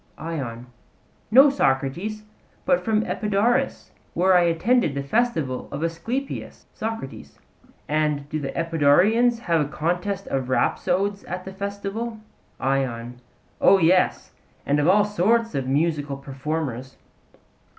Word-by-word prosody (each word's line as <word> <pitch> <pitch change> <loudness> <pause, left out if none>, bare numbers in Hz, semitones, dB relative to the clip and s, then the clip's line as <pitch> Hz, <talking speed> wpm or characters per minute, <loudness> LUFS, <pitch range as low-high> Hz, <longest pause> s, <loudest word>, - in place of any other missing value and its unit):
ION: 130 -8 -5 0.6
No, 270 +5 +7
Socrates; 175 - -1 0.4
but - - +2
from 220 -1 +1
Epidaurus, 210 +2 0 0.2
where 185 +2 +4
I 175 -1 +5
attended 170 - +2
the 140 - -2
festival 155 - -1
of 155 - -4
Asclepius. 230 +12 -4
SOCRATES: 225 -11 -6 0.5
And 150 -2 0
do 155 +1 -3
the 135 -2 -4
Epidaurians 175 +10 +3
have 165 - +1
contests 180 +6 -2
of 130 -1 -3
rhapsodes 195 +9 0
at 180 +1 -6
the 190 - -7
festival? 200 +4 -4 0.4
ION: 125 -3 -2 0.4
O 195 - +7
yes; 180 +1 +2 0.3
and 145 +1 +2
of 145 - +2
all 205 +3 +5
sorts 220 +3 +1
of 135 -2 -2
musical 145 0 0
performers. 135 -2 -5
170 Hz, 120 wpm, -23 LUFS, 140-210 Hz, 0.6 s, No